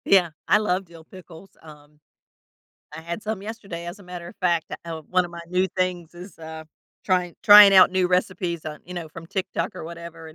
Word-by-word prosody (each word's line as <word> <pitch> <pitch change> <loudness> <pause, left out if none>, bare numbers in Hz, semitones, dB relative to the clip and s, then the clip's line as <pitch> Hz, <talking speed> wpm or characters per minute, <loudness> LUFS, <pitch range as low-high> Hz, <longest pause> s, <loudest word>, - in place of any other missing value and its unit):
Yeah, 180 -4 +4 0.2
I - - +5
love 195 -3 -1
dill 165 -2 -15
pickles. 180 +1 -15
Um, 150 -1 -16 1.0
I 155 - -7
had 170 +5 -6
some 215 -2 -4
yesterday, 200 -6 -7
as 175 +4 -7
a - - -15
matter 180 -2 -9
of - - -14
fact, 170 -3 0 0.2
uh, 165 -1 -6
one 185 0 +2
of 175 - -8
my 170 0 -9
new 180 +1 +1
things 180 -2 -2
is, 180 +3 -12
uh, 160 0 -9 0.4
trying 180 -2 0
trying 205 -1 +9
out 185 0 +8
new 185 -1 +1
recipes 180 -2 -1
on, 150 -1 -6
you 180 - -9
know 170 -2 -6
from 165 +2 -11
TikTok 190 +2 -3
or - - -8
whatever, 170 0 -9
175 Hz, 205 wpm, -23 LUFS, 165-185 Hz, 1.0 s, trying